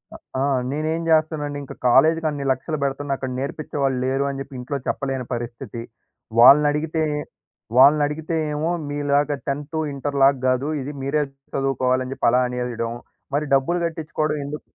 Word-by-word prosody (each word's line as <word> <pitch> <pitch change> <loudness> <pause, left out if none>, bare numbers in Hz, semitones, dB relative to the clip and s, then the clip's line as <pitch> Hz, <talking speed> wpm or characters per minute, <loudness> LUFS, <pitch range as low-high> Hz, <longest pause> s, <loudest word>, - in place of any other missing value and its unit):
ఆహ్, - - -14 0.2
ఆ! - - +2 0.2
నేనేం 155 +3 -1
జేస్తనండి 155 -2 +1
ఇంక 135 - -9
కాలేజీకి 160 +6 +4
అన్ని 145 -2 -4
లక్షలు 155 +5 -2
బెడుతున్నా 140 0 -1
అక్కడ 130 - -4
నేర్పించేవాళ్లు 140 -1 -2
లేరు 135 +1 +1
అని 135 -1 -4
జెప్పి 135 -1 -8
ఇంట్లో 130 +3 -3
చెప్పలేని 135 -2 -2
పరిస్థితి. 120 0 -5 0.6
వాళ్లనడిగితే 150 +5 +6 0.7
వాళ్లనడిగితే 150 +4 +4 0.2
ఏమో 155 +3 -1 0.2
మీలాగా 145 0 +1
10థ్, 145 +3 -3 0.2
ఇంటర్ 140 +1 -3
లాగా 135 0 +5
గాదు 130 +3 +1
ఇది 140 - -5
మీరే 145 +3 +1 0.3
చదువుకోవాలని 130 -1 0
జెప్పి - - 0
అలా 125 - +4
అనేయడం. 125 -2 -3 0.4
మరి 150 +1 0
డబ్బులు 135 +6 +1
గట్టించుకోవడం 155 -2 -2
ఎందుకు? 150 +2 -6
140 Hz, 140 wpm, -22 LUFS, 130-150 Hz, 0.7 s, వాళ్లనడిగితే